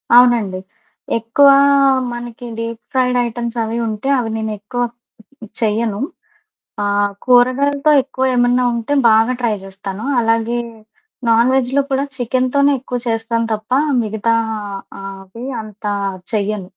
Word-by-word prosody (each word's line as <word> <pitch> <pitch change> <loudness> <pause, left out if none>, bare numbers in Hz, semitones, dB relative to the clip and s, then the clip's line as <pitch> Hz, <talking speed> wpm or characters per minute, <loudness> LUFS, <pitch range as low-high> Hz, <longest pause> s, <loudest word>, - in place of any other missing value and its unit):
అవునండి. 235 -6 +5 0.6
ఎక్కువా 275 +5 +5 0.6
మనకి 240 0 -8
డీప్ 230 0 -4
ఫ్రైడయిటెమ్సవి 240 -2 0
ఉంటే 215 +4 -4
అవి 230 -3 -1
నేనెక్కువ 220 +2 -4 0.8
చెయ్యను. 220 -1 0 0.8
ఆ! - - 0 0.4
కూరగాయలతో 275 +4 +3
ఎక్కువ 260 -1 -3
ఏమన్నా 245 +1 +3
ఉంటే 235 +4 -3 0.2
బాగా 225 +3 +4
ట్రై 230 -3 +1
జేస్తాను. 195 +2 -7 0.2
అలాగే 230 +1 +1 0.7
నాన్ 230 +2 +4
వెజ్‌లో 265 +1 +2
కూడా 270 +1 +1
చికెనుతోనే 255 +3 +1
ఎక్కువ 250 -1 -4
చేస్తాం 225 0 -1
తప్పా 215 +5 0 0.2
మిగతా 220 +1 0 0.7
ఆహ్, 195 0 -7
అవి 230 +7 -9 0.2
అంతా 210 -1 -5 0.4
చెయ్యను. 205 -2 -2
230 Hz, 105 wpm, -17 LUFS, 220-250 Hz, 0.8 s, అవునండి